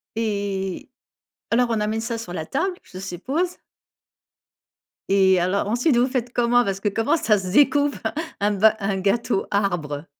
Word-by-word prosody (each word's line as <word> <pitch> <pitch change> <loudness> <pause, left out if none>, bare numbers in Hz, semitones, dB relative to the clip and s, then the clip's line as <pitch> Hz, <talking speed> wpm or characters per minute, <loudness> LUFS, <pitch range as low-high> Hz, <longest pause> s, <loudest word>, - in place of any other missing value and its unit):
Et 200 -4 -3 0.6
alors 245 +1 +3
on 220 -2 0
amène 215 +1 -1
ça 230 0 -3
sur 200 -6 -7
la 160 -3 -4
table, 360 +6 -1
je 185 - -11
suppose? 265 - -3 1.5
Et 190 -2 +4
alors, 185 +3 0
ensuite, 240 +4 +2
vous 245 +2 +3
faites 250 -2 -2
comment? 245 0 +3
Parce 195 -2 -2
que 205 - -2
comment 225 +10 +1
ça 215 -7 +2
se 190 -1 -5
decoupe 285 0 +4 0.4
un 205 +1 +2
bas 215 +2 +4
un 195 -1 -1
gâteau 200 +2 0
arbre? 170 -7 -1
215 Hz, 160 wpm, -23 LUFS, 195-245 Hz, 1.5 s, Et